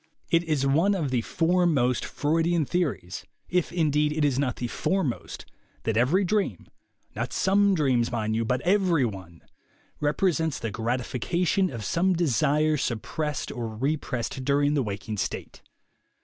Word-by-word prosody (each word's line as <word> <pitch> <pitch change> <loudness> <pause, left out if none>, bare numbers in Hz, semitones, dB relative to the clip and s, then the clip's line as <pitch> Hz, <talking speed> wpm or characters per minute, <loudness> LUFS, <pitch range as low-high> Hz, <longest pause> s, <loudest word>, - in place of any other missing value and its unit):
It 165 0 +4
is 150 -4 0
one 165 +9 +3
of 155 -8 -2
the 125 -2 +1
foremost 165 -5 +1
Freudian 165 +2 +1
theories 135 - -2
— - - -43
if, 170 - -6
indeed, 150 -3 +1
it 150 0 +1
is 135 -2 +1
not 135 -4 0
the 125 - -4
foremost 150 +2 -2 0.2
— - - -36
that 110 - -1
every 135 - +3
dream 190 - -1 0.5
(not - - -3
some 200 +1 +3
dreams, 130 -7 +1
mind 110 -2 -1
you, 115 - +1
but 125 +3 0
every 180 -6 +3
one!) 95 -6 -7 0.6
rep 150 +5 -1
resents 160 -5 +1
the 115 -3 -4
gratification 125 - 0
of 115 -5 -6
some 185 - +2
desire 155 -1 +2
suppressed 150 +5 -3
or 120 -2 -4
repressed 130 -2 -2
during 145 +2 +2
the 145 - +2
waking 105 -1 -4
state. - - -4
145 Hz, 155 wpm, -26 LUFS, 120-170 Hz, 0.6 s, It